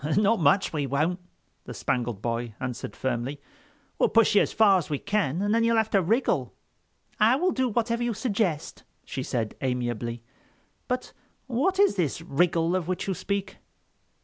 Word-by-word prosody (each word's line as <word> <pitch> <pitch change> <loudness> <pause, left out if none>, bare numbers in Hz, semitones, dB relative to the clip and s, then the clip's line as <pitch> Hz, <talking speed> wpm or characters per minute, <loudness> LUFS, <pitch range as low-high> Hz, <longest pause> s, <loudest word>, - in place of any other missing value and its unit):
"Not 210 +1 +3
much 165 +5 +3
we 145 -3 -1
won't," 155 +7 0 0.5
the - - -8
Spangled 120 -5 -2
Boy 115 -1 -3
answered 125 -2 -5
firmly. 130 +2 -3 0.6
"We'll - - +4
push 230 -1 +4
you 205 - +6
as - - 0
far 200 -4 +5
as 170 - -7
we 145 - -1
can, 195 -2 -1
and 205 +1 +1
then 230 0 +3
you'll 230 0 +3
have 220 -1 +1
to 195 - +4
wriggle." 180 - 0 0.6
"I 225 +4 +5
will 360 +7 +1
do 260 -4 0
whatever 235 +1 0
you 240 -2 -1
suggest," 200 - -2 0.2
she 135 - -4
said 115 -4 -2
amiably; 120 -2 -2 0.6
"but 250 0 -3 0.3
what 275 +10 0
is 405 - +4
this 160 -6 0
wriggle 165 +2 +1
of 180 -3 -2
which 185 +1 -2
you 195 - 0
speak?" 195 +2 -3
180 Hz, 175 wpm, -26 LUFS, 130-225 Hz, 0.6 s, you